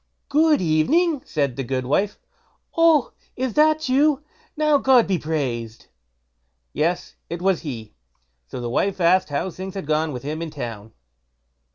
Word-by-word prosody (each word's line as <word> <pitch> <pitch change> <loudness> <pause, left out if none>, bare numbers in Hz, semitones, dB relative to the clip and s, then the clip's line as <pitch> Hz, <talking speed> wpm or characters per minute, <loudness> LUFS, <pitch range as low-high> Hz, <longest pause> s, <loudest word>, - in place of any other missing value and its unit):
"Good 305 -2 +4
evening!" 275 - +2
said 140 -5 -1
the 135 - -2
goodwife. 130 - -1 0.6
"Oh! 330 -5 +4 0.2
is 260 -2 -2
that 310 0 +3
you? 285 +2 +3 0.3
now 305 -2 +3
God 260 -3 +5
be 190 -3 0
praised." 125 -8 -4 0.8
Yes! 170 +4 -1 0.2
it 170 - -4
was 185 -1 +1
he. 120 -9 -7 0.5
So - - -7
the 120 - -4
wife 190 +11 0
asked 180 0 +3
how 145 +6 -2
things 190 +2 -7
had 195 - -5
gone 155 +1 0
with 125 -2 -6
him 155 +3 -4
in 165 - -4
town? 115 -7 -7
170 Hz, 150 wpm, -22 LUFS, -, 0.8 s, God